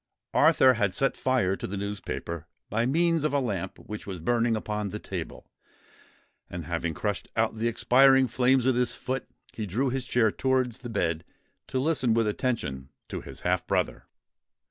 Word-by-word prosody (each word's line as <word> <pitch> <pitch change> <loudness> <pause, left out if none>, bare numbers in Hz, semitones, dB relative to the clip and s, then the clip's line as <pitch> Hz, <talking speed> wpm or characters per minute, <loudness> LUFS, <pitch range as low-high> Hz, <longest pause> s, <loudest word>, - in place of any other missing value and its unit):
Arthur 130 -1 +6
had 100 -5 0
set 135 - +2
fire 125 -8 +1
to - - -5
the 100 - -4
newspaper 95 -5 -5 0.2
by 115 +3 +1
means 165 +2 +2
of 150 -2 +1
a - - +4
lamp 105 -9 -3
which 105 -1 -8
was 95 -3 -5
burning 115 +5 +1
upon 105 -1 -3
the - - -5
table; - - -7 1.0
and, 85 -2 -6
having 85 -1 -2
crushed 105 +1 -2
out 110 -1 0
the 115 - +1
expiring 135 +3 +5
flames 125 +1 +2
with 130 -1 +3
his 125 -1 +1
foot, 130 0 -4 0.3
he 110 -2 -4
drew 125 +8 0
his 130 -1 -2
chair 115 -3 +3
towards 130 -2 0
the 120 - -7
bed, 85 -7 -1 0.4
to - - -3
listen 130 -4 +2
with 115 -1 +3
attention 90 - -2 0.2
to - - -4
his - - -9
half - - 0
brother. - - -1
115 Hz, 175 wpm, -27 LUFS, 100-130 Hz, 1.0 s, Arthur